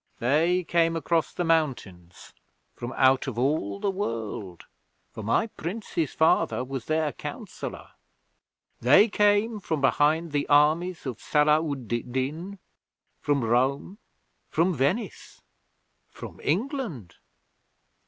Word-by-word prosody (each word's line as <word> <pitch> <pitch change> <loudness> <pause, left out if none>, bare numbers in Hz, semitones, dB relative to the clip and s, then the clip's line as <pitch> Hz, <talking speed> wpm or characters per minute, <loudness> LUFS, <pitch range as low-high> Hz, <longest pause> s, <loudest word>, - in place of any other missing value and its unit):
They 165 +9 +2
came 165 -1 +1
across 165 0 0
the 175 - -3
mountains, 125 - -2 0.4
from 120 +1 -6
out 130 +1 +3
of 125 -4 -4
all 120 -7 0
the 195 - 0
world, 110 - -5 0.5
for - - -8
my 115 - +1
Prince's 175 -5 -4
father 160 -5 +2
was 130 -1 -6
their 155 -1 0
counsellor. - - -7 0.9
They 145 - +6
came 210 +2 +2
from 160 -5 -2
behind 150 +5 +2
the 145 -1 -1
armies 155 +5 +3
of 125 -5 -5
Sala 150 +1 +3
ud 140 -6 -4
Din: 130 - -3 0.6
from 140 -3 0
Rome: 130 - 0 0.5
from 175 +4 +1
Venice: 175 - -2 0.7
from - - -11
England. 190 - -3
150 Hz, 115 wpm, -26 LUFS, 125-175 Hz, 0.9 s, They